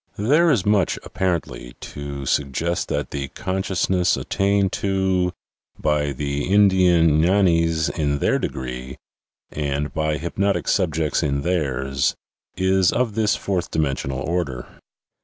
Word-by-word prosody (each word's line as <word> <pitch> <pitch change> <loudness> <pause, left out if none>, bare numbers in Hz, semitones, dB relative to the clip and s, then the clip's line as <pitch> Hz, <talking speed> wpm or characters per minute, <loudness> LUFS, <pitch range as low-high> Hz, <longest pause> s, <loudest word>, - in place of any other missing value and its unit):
There 150 +11 +3
is 120 - +2
much, 105 -2 +2
apparently, 85 -9 -3
to 70 -1 -6
suggest 75 +6 -1
that - - -3
the 70 -1 -3
consciousness 95 0 0
at - - -7
tained 100 -1 +2
to 95 -2 +1 0.5
by 75 -1 0
the 70 +1 -3
Indian 90 -6 +4
gfianis 85 -3 +3
in 70 -2 +1
their - - +1
degree, 65 +1 -5 0.5
and 75 0 -2
by 80 -1 0
hypnotic 100 +5 -1
subjects 80 -5 +1
in 70 -1 -1
theirs, 70 -6 0 0.4
is 95 -1 +3
of 120 -4 0
this 110 -1 +2
fourth 90 -3 -2
dimensional 70 -4 -2
order. 75 -7 -2
85 Hz, 120 wpm, -22 LUFS, 70-95 Hz, 0.5 s, Indian